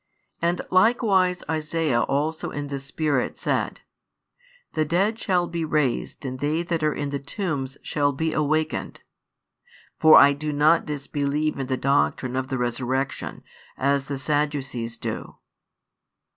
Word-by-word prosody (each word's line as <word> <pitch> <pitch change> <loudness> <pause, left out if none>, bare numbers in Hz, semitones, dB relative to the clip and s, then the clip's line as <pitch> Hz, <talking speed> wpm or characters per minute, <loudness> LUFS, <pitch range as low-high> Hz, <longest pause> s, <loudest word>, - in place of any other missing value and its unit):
And 170 +1 +1
likewise 190 -3 +3
Isaiah 155 -4 0
also 155 +3 -1
in 145 -1 -5
the 140 -1 -3
Spirit 145 -1 -1
said: - - -1 0.9
The 155 - +1
dead 195 +8 +1
shall 180 -3 +1
be 170 -1 -3
raised 150 -4 -1
and 130 0 -4
they 155 +4 0
that 170 -2 -2
are 155 0 +2
in 145 -1 -3
the 140 0 -3
tombs 140 -3 -4
shall 145 -1 +1
|118 135 - -10
be 160 +1 0
awakened. 155 +1 -1 1.0
For 160 -1 +8
I 140 0 +8
do 150 +2 -3
not 150 +3 +3
disbelieve 145 +1 -1
in 135 - -2
the 130 0 -1
doctrine 135 -2 +1
of 130 0 -1
the 135 -1 -2
resurrection, 125 +2 -2 0.3
as 140 0 +1
the 140 -1 -4
Sadducees 135 -5 -2
do." - - -5
145 Hz, 145 wpm, -24 LUFS, 135-160 Hz, 1.0 s, For